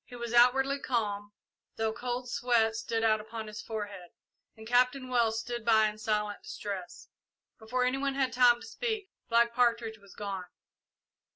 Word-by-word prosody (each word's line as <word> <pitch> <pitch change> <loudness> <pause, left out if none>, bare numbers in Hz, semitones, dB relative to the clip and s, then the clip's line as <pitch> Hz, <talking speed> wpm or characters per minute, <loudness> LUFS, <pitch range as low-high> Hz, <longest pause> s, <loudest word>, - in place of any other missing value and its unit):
He 245 - -12
was 235 -1 -5
outwardly 270 +3 +5
calm, 205 -6 -2 0.4
though 220 0 -1
cold 245 +1 -4
sweat 235 -2 +2
stood 225 0 -2
out 215 -1 +3
upon 220 +1 -7
his 215 0 -7
forehead, 205 -5 -6 0.5
and 220 - -11
Captain 250 +2 +2
Wells 230 -3 +2
stood 240 0 -5
by 220 -1 +5
in 210 0 -10
silent 210 -1 -1
distress. 195 -3 -7 0.5
Before 250 +3 -1
any 255 +2 0
one 275 -1 -1
had 265 -3 0
time 245 -1 +5
to - - -9
speak, 445 -3 -3 0.2
Black 235 0 +4
Partridge 230 -2 +1
was 200 -1 -17
gone. 195 -3 -4
230 Hz, 165 wpm, -30 LUFS, 215-250 Hz, 0.5 s, outwardly